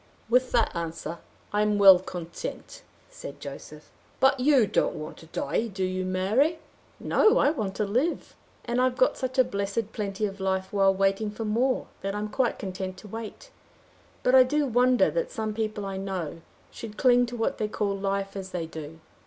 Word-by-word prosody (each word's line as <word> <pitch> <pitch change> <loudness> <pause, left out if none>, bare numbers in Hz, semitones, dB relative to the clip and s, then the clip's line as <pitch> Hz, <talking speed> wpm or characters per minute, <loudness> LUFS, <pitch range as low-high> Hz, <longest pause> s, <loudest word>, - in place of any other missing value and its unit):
"With 250 +2 +3
that 230 -6 +2
answer 170 0 -5 0.3
I 210 - +2
am 210 -1 +2
well 195 -2 +9
content," 175 -2 -7 0.3
said - - -9
Joseph. - - -10 0.3
"But 270 0 +4
you 265 -3 +5
don't - - 0
want 155 +1 -7
to 160 - -14
die, 225 +7 -1
do 195 -3 -4
you, 185 0 -1
Mary?" 210 - +1 0.4
"No; 440 +3 +3
I 285 - +4
want 215 -10 -3
to 210 - 0
live. 250 +12 -1 0.3
And 240 +1 0
I've 255 -1 +1
got 255 - +3
such 260 0 -4
a 260 - +7
blessed 200 +1 -3
plenty 205 0 -2
of 200 -1 -5
life 190 0 -2
while 195 -1 +4
waiting 195 +2 +1
for 215 +2 -5
more, 245 +5 +1 0.2
that 195 +1 -3
I - - -2
am 210 0 -3
quite 245 +2 0
content 185 -1 -5
to 210 - -12
wait. 225 - -8 0.7
But 250 - +3
I 260 - +9
do 290 +4 +2
wonder 250 -3 +3
that - - -1
some 215 - -3
people 215 -2 -3
I 195 -1 -4
know, 185 -4 -4 0.3
should 215 -2 -9
cling 245 -1 +4
to 240 0 -6
what 225 +4 -1
they 215 - 0
call 205 -1 -1
life 195 0 -2
as 190 -1 -6
they 180 -3 -3
do. 160 0 -9
210 Hz, 195 wpm, -27 LUFS, 190-250 Hz, 0.7 s, well